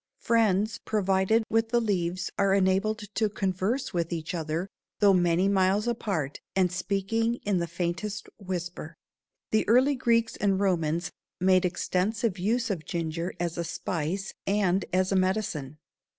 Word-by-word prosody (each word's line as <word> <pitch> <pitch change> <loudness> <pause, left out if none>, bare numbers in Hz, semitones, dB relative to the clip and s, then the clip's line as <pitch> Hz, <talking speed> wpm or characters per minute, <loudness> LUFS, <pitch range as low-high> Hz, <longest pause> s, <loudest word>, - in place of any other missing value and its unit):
Friends 215 -2 +2
provided 195 +1 +2
with 225 0 +1
the 240 +1 +3
leaves 185 -5 -1
are 195 -1 +3
enabled 200 +3 +1
to 215 -2 +1
converse 200 +6 -1
with 170 -1 -1
each 165 0 -3
other, 165 +2 -2 0.3
though 205 -2 +5
many 175 +1 +3
miles 200 +2 +2
apart 195 - -2 0.2
and 185 -2 +3
speaking 200 +5 0
in 200 -3 +1
the 170 - -1
faintest 175 +5 -3
whisper. 180 -3 -5 0.6
The 215 - +3
early 255 +6 +5
Greeks 235 -3 +1
and 195 -2 +1
Romans 170 -4 0 0.3
made 185 0 +4
extensive 185 +3 -1
use 230 +4 0
of 170 -5 -3
ginger 165 +1 -3
as 170 -1 -2
a - - 0
spice 175 +3 -3
and 195 -2 +2
as 185 +1 +1
a - - +2
medicine. 185 -7 -1
190 Hz, 145 wpm, -27 LUFS, 175-215 Hz, 0.6 s, though